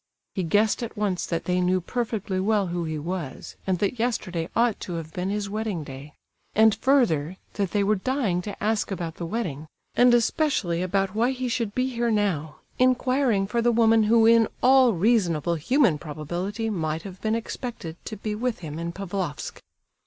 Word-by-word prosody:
He 190 - -1
guessed 205 +7 +2
at 230 -2 -6
once 200 -4 -1
that 165 -1 -2
they 180 0 +1
knew 185 +1 +2
perfectly 210 -1 -2
well 205 +1 +2
who 175 -1 -2
he 155 -1 -3
was, 165 -2 -5
and 185 -1 +2
that 205 +6 -1
yesterday 185 -8 -1
ought 235 -2 +2
to 180 - -6
have 165 -1 -6
been 180 +1 -2
his 205 0 -2
wedding 210 -5 -3
day; 140 +2 -10 0.4
and 220 0 +6
further 200 - +2 0.2
that 200 -3 -1
they 205 +1 +1
were 210 +1 +2
dying 210 -5 0
to 200 +1 -7
ask 215 0 +1
about 170 -4 -4
the 170 - -4
wedding, 165 -9 -3 0.3
and 245 0 +5
especially 225 - +1
about 195 +1 0
why 230 +3 +2
he 260 -1 -2
should 230 -4 -2
be 255 +1 +1
here 240 -2 -1
now, 190 -9 0 0.2
inquiring 255 -4 +2
for 235 +4 -1
the 240 +1 +3
woman 225 -1 +4
who 225 +1 +5
in 230 -1 +6 0.2
all 255 -2 +6
reasonable 175 -5 +2
human 180 - +2
probability 175 +9 -4
might 160 -6 -2
have 190 -2 -9
been 220 0 +1
expected 230 -7 -5
to 215 - -6
be 210 +1 -3
with 230 -1 -2
him 150 +1 -6
in 170 0 -3
Pavlofsk. 185 -4 -4
200 Hz, 185 wpm, -25 LUFS, 175-230 Hz, 0.4 s, and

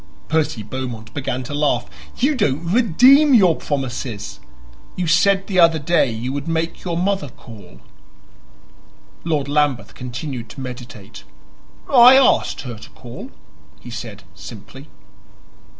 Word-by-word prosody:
Percy 155 -8 0
Beaumont 115 -2 -7
began 130 -2 -3
to 135 - -7
laugh. 145 0 0 0.3
"You 275 +5 +2
don't 165 - -1
redeem 255 - +5
your 185 -7 +5
promises. 125 -7 -5 0.6
You 180 - -2
said 195 +4 +3
the 185 -3 -1
other 165 -1 +5
day 155 -2 +1
you 120 +4 -4
would 145 +2 -5
make 165 0 -3
your 170 -2 -3
mother 190 -4 -1
call." 100 - -15 1.4
Lord 155 -4 -1
Lambeth 145 -3 0
continued 125 -1 -7
to - - -11
meditate. 125 - -9 0.6
"I 250 -1 +8
asked 265 -1 +3
her 120 -5 -8
to - - -13
call," 120 -1 -11 0.5
he 120 - -11
said 110 -3 -8
simply. 125 +6 -12
145 Hz, 130 wpm, -20 LUFS, 120-175 Hz, 1.4 s, I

